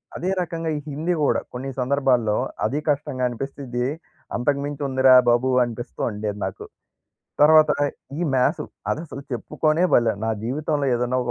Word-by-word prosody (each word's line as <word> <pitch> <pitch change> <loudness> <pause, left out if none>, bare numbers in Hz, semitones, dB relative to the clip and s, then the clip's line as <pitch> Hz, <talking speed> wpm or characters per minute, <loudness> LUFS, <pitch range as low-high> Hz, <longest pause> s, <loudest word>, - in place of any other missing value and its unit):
అదే 180 - -2
రకంగా 165 -2 -3
ఈ - - -3
హిందీ 155 +5 -1
గూడా, 145 - +2
కొన్ని 130 +2 -5
సందర్భాల్లో 125 -5 +2 0.3
అది 145 - 0
కష్టంగా 145 -3 -1
అనిపిస్తది. 125 0 -4 0.5
అంతకు 140 +4 +1
మించి 145 0 -5
ఉందిరా 130 0 +5 0.2
బాబు 120 +2 +3
అనిపిస్తూ 120 0 -6
ఉండేది 105 0 -4
నాకు. 95 - -6 0.8
తర్వాత 155 0 +7 0.5
ఈ - - -2
మ్యాథ్స్. 130 +5 +1 0.3
అదసలు 155 -3 -4
చెప్పుకొనే 155 +7 0
బలే 115 -2 +4
నా 115 - +1
జీవితంలో 145 +3 -1
ఏదన్నా 125 +1 0
ఒక 120 - -2
135 Hz, 145 wpm, -23 LUFS, 120-150 Hz, 0.8 s, తర్వాత